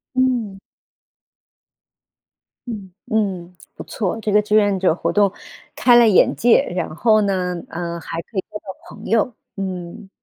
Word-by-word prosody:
嗯。 240 -7 0 2.1
嗯， 200 -6 -7 0.2
嗯， 185 -5 -1 0.2
不 - - -9
错。 210 +1 -3
这 215 - -1
个 210 +1 +5
志 210 0 0
愿 205 -2 +3
者 185 -3 +3
活 170 - -2
动 205 -2 +3 0.4
开 245 -1 +5
了 235 -1 +7
眼 200 - +4
界， 240 0 +4
然 180 -3 -3
后 215 +2 +3
呢， 185 -3 -1
呃， 170 0 -5
还 165 +1 -5
可 200 - -12
以 - - +2
交 210 - -9
到 190 -2 -12
朋 - - -12
友， 225 +1 +1 0.2
嗯。 185 0 -6
200 Hz, 165 characters per minute, -20 LUFS, 180-220 Hz, 2.1 s, 了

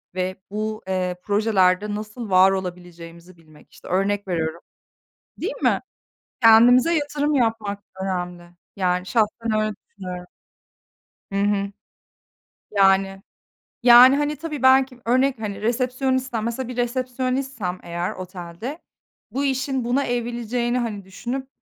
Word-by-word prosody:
ve 185 0 -2 0.2
bu, 215 +1 -3
eee, 185 -1 -1
projelerde 205 -1 +2
nasıl 215 +1 -6
var 185 +1 +6
olabileceğimizi 175 -2 -7
bilmek 155 -2 -20
işte - - -15
örnek 195 +2 0
veriyorum. 165 -1 -2 0.8
Değil - - -3
mi? - - +3 0.6
Kendimize 245 +7 +7
yatırım 295 -1 0
yapmak 220 -5 0 0.2
önemli. 180 -2 -3 0.3
Yani, 180 -1 0
şahsen 220 0 0
öyle 215 0 0 0.2
düşünüyorum. 180 -2 -7 1.1
Hı - - -2
hı. 200 -1 0 1.0
Yani, 195 -1 +3 0.6
yani, 250 +2 +9
hani, 295 +1 0
tabii 300 -3 -6
belki 260 -1 +4
örnek, 255 +1 +2
hani 210 -2 -5
resepsiyonistsem, 255 0 -1
mesela 235 +2 -3
bir 250 0 -7
resepsiyonistsem 255 -4 -2
eğer 175 +1 -3
otelde, 185 - -7 0.5
bu 280 +2 -1
işin 265 -1 -1
buna 250 +4 +1
evrileceğini, 240 0 -1
hani, 220 -5 -3
düşünüp 245 +7 -5
215 Hz, 115 wpm, -23 LUFS, 185-250 Hz, 1.1 s, yani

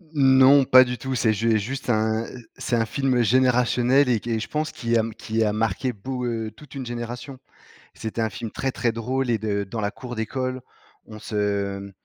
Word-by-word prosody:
Non, 135 0 +6
pas 130 0 +8
du 125 -1 -4
tout, 130 +1 -4
c'est 110 -1 +2
ju 115 +2 +1
et 110 - +3
juste 130 +5 -5
un, 110 0 +1
heu, 120 -1 -11
c'est 125 - -1
un 115 -1 +2
film 130 +1 0
générationnel, 125 +2 +3
et 115 - +2
qui, 115 +1 -2
je 110 - -5
pense, 155 0 -2
qui 115 -1 0
a - - +4
m 110 0 -4
qui 110 +1 -1
a 105 -1 +1
marqué 115 +3 -1
beau 125 +5 -5
heu, 115 -2 -3
toute 140 +7 -15
une 130 -2 -5
génération. 120 +3 -6 0.5
C'était 110 +1 -4
un 110 - +1
film 110 +2 -6
très, 135 -1 -2
très 120 -2 0
drôle, 125 +3 -2
et 115 - +2
de 100 -1 -1
dans 110 +3 -5
la 100 0 -1
cour 125 -2 -8
d'école, 130 +3 -3 0.4
on 110 -1 -11
se, 100 -2 -2
mmh, 100 0 -9
120 Hz, 220 wpm, -24 LUFS, 110-130 Hz, 0.5 s, pas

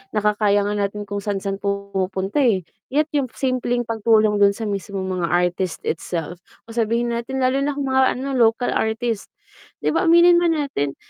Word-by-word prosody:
nakakaya 205 -1 +2
nga 205 - -1 0.2
natin 205 +1 -7
kung 205 0 -4
saan-saan 195 -1 -3
pumunta 200 +2 -2
eh. 215 -9 +2 0.2
Yet, 300 +3 0
yung 280 -3 0
simpleng 245 -2 -1
pagtulong 220 -2 +2
dun 200 0 +4
sa 225 - -6
mismong 195 -2 -3
mga 170 - 0
artist 175 +1 -1
itself 170 +1 -4 0.2
o 230 - -13
sabihin 235 +1 0
natin 255 +3 -3
lalo 260 +2 +2
na 280 0 -1
kung 285 - -2
mga 265 0 +3
ano 270 +2 -4
local 230 +2 +3
artist, 220 -1 -1 0.6
di - - +2
ba 365 - +1
aminin 345 +1 +6
man 335 -2 +2
natin, 145 - -2
215 Hz, 175 wpm, -21 LUFS, 200-255 Hz, 0.6 s, aminin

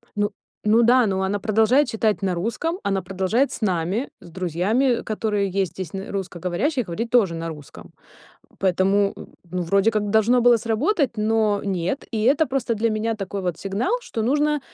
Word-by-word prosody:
Ну 205 0 +1 0.4
ну 220 +3 +5
да, 245 +1 +5
но 190 -1 -1
она 205 +2 -1
продолжает 225 +6 +3
читать 220 -2 0
на 190 -2 0
русском, 280 - -2
она 195 -1 0
продолжает 195 +9 0
с - - -6
нами, 190 +3 -1
с - - -13
друзьями, 190 - 0
которые 210 -2 -1
есть 190 -1 -1
здесь 185 -4 -6
н 195 0 -6
русскоговорящие, 190 - -2
и - - -18
говорить 205 +7 -4
тоже 215 -9 +3
на 165 0 -4
русском. 150 -3 -11 0.7
Поэтому, 195 +2 +2 0.3
ну, 180 +1 -4
вроде 195 +5 +2
как 210 -2 -1
должно 220 +4 +3
было 240 0 +6
сработать, 235 - 0
но 215 -1 +1
нет. 190 +5 -2
И 215 -1 -1
это 285 +6 +3
просто 250 -2 -1
для 230 +2 0
меня 220 +1 -1
такой 195 -1 -5
вот 175 -3 -2
сигнал, 200 - -2
что 225 - -4
нужно, 295 +4 +1
210 Hz, 180 wpm, -23 LUFS, 190-235 Hz, 0.7 s, было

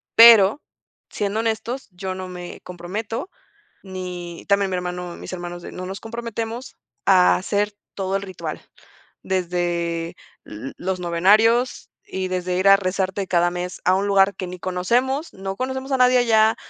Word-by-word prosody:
pero 230 +1 +8 0.5
siendo 205 +1 -2
honestos, 230 +3 -2
yo 185 +1 -5
no 185 0 -6
me 180 -1 -8
comprometo 205 - -5 0.5
ni 180 -3 -7
también 200 -1 +3
mi 185 - -1
hermano 180 -1 -4
mis - - -9
hermanos 175 -1 -6
de - - -8
no 185 - -6
nos 190 +1 -6
comprometemos 230 +1 -5 0.3
a 185 -2 +6
hacer 205 +2 -1 0.2
todo 195 0 -1
el 195 - -3
ritual. 190 -2 -6 0.7
Desde 175 -2 -1 0.3
l 110 +6 -8
los 185 0 -3
novenarios 215 +8 +3 0.2
y 190 0 -3
desde 180 0 -1
ir 190 +1 +4
a 195 - +9
rezarte 190 0 -2
cada 175 -1 +2
mes 180 +1 -5
a 185 - +5
un 195 +2 0
lugar 200 0 +4
que 185 - -4
ni 180 0 -7
conocemos, 245 - 0
no 195 0 -5
conocemos 265 +2 -3
a - - +4
nadie 250 0 +5
allá, 220 -2 +4
190 Hz, 160 wpm, -22 LUFS, 180-220 Hz, 0.7 s, a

